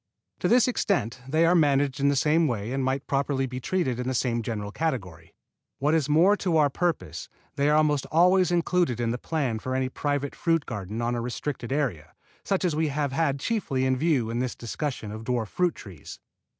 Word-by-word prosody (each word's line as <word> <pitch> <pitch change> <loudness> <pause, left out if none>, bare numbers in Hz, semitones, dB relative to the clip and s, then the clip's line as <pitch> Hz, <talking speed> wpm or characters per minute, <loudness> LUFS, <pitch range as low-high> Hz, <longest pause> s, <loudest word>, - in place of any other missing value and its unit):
To - - 0
this 245 0 +5
extent 180 - -1
they 155 +4 +3
are 170 - +4
managed 145 -4 +2
in 140 - +2
the 140 - +2
same 155 +4 +3
way 110 -3 -3
and 135 0 -1
might 130 +1 -1
properly 135 -1 0
be 125 0 -5
treated 130 -4 -1
in 125 - -3
the 130 - -1
same 120 -1 0
general 105 -3 -4
category. 95 - -4 0.4
What 145 +3 +1
is 155 -3 +1
more 170 +7 +5
to 175 -5 0
our 145 -2 +3
purpose, 95 - -2 0.3
they 140 +1 +2
are 150 - +4
almost 150 -3 +2
always 180 +2 +4
included 170 -7 +1
in 115 -1 0
the 120 - -3
plan 140 -8 -1
of - - -8
any 130 0 0
private 145 +1 -2
fruit 165 -3 +1
garden 105 0 -5
on 120 +1 0
a 120 - -2
restricted 125 +1 -4
area, 120 - -2 0.3
such 195 -1 0
as 170 -4 0
we 160 +1 +1
have 145 -1 -1
had 140 -1 0
chiefly 140 - -1
in 130 0 +2
view 130 -6 +1
in 120 - -2
this 125 -1 -2
discussion 120 -2 -4
of 110 +1 -7
dwarf 115 -3 -1
fruit 180 -2 0
trees. 90 -9 -11
135 Hz, 210 wpm, -26 LUFS, 120-160 Hz, 0.4 s, this